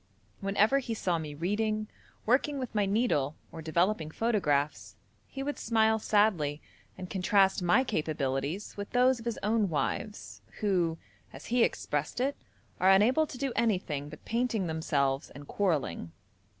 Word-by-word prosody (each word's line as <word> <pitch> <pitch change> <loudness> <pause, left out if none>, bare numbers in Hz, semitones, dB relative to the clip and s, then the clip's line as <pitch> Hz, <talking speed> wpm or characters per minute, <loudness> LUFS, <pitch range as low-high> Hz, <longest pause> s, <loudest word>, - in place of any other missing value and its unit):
Whenever 205 +7 +3
he 240 -4 -4
saw 180 -5 0
me 150 -2 -6
reading, 215 +6 -1 0.4
working 280 +5 +2
with 255 -3 -5
my 205 -2 +1
needle, 195 - +1 0.2
or 165 - -8
developing 165 +1 0
photographs, 155 -9 0 0.3
he 270 - -6
would 290 +1 -3
smile 220 -1 +2
sadly, 195 -10 +2 0.4
and 185 - -6
contrast 190 +1 +2
my 175 +9 +4
capabilities 155 - -2
with 205 0 -6
those 250 0 +4
of 225 - -11
his 235 -2 -2
own 210 -1 +2
wives, 165 +7 -3 0.2
who, 180 -6 +1 0.3
as - - -11
he 245 -1 +5
expressed - - -1
it, 275 +3 0 0.4
'are 185 - +4
unable 240 +11 +5
to 255 - -8
do 270 -1 -2
anything 175 -10 0
but 155 - -12
painting 230 -4 0
themselves 145 -4 0
and 145 +1 -12
quarrelling.' 150 - -1
200 Hz, 150 wpm, -30 LUFS, 160-225 Hz, 0.4 s, he